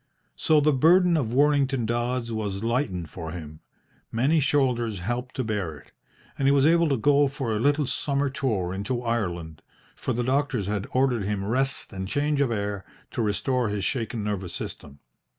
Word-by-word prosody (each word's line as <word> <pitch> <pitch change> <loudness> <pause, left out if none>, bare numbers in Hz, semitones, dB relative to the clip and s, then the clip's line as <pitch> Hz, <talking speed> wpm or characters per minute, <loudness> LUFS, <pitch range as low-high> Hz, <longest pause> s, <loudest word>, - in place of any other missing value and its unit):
So 155 - +3
the 150 +1 +3
burden 170 +6 +5
of 130 -8 0
Worlington 135 -2 +2
Dodds 120 +1 -1
was 105 -2 -3
lightened 115 - -1
for 80 -2 -6
him; 80 -3 -8 0.5
many 135 +8 +2
shoulders 125 -6 +1
helped 120 +7 -4
to 130 - -1
bear 100 -9 -3
it, - - -18 0.5
and 135 - +2
he - - +6
was 140 -1 +4
able 170 0 +4
to 135 - +2
go 145 +5 +4
for 135 -4 -3
a - - -1
little 145 +4 +2
summer 140 +2 0
tour 110 -10 -1
into 120 +6 -3
Ireland, 85 -9 -2 0.3
for - - -3
the 120 0 0
doctors 130 -4 0
had 100 0 -2
ordered 125 -5 +1
him 100 -1 -2
rest 130 +5 -1
and 95 0 -4
change 145 +5 0
of 140 - +2
air 100 -3 -2 0.3
to - - -2
restore 115 +3 0
his 100 -2 -2
shaken 115 -1 -2
nervous 100 -4 -3
system. 70 0 -7
120 Hz, 180 wpm, -26 LUFS, 100-140 Hz, 0.5 s, he